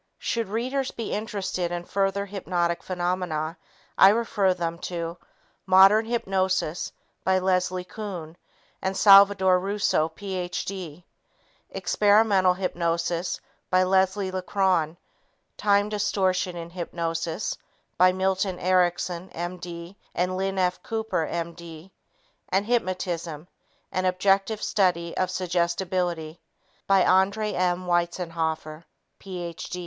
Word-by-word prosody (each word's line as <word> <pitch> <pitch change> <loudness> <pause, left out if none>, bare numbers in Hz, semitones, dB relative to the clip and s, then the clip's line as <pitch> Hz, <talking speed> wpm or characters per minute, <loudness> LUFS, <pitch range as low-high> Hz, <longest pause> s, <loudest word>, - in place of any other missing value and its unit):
Should 230 -3 -2
readers 255 +5 -1
be 230 - -5
interested 190 -4 -2
in 175 0 -4
further 195 +1 0
hypnotic 180 -3 -1
phenomena, 175 -3 -2 0.4
I 190 - +9
refer 210 -3 +2
them 170 -1 -3
to 170 -1 -5 0.5
Modern 195 +4 +7
Hypnosis 190 -7 -1 0.3
by 190 0 +3
Leslie 185 -1 0
Kuhn 180 -5 -7 0.5
and 190 0 -2
Salvadore 195 -2 +7
Russo, 195 -4 +1
Ph.D., 180 -2 -5 0.6
Experimental 205 -3 +3
Hypnosis 170 -1 -1 0.3
by 185 0 +4
Leslie 190 +1 +2
LeCron, 185 -3 0 0.6
Time 205 0 +2
Distortion 190 -3 0
in 170 0 -7
Hypnosis 165 -2 -3 0.4
by 185 0 +7
Milton 190 0 0
Erickson, 180 0 +1
M.D. 175 +1 -6 0.2
and 180 +1 0
Lynn 195 +1 -2
F. 180 -1 0
Cooper, 220 -7 -2
M.D., 170 0 -6 0.6
and 195 +2 +1
Hypnotism 180 -8 -2 0.4
An 185 0 -1
Objective 195 +3 +1
Study 175 -5 +1
in 185 - +1
Suggestibility 175 -2 -1 0.5
by 195 -2 +5
André 200 +3 +2
M. 180 0 0
Weitzenhoffer, 165 -2 -2 0.4
Ph. 175 -3 -7
185 Hz, 100 wpm, -25 LUFS, 170-195 Hz, 0.6 s, I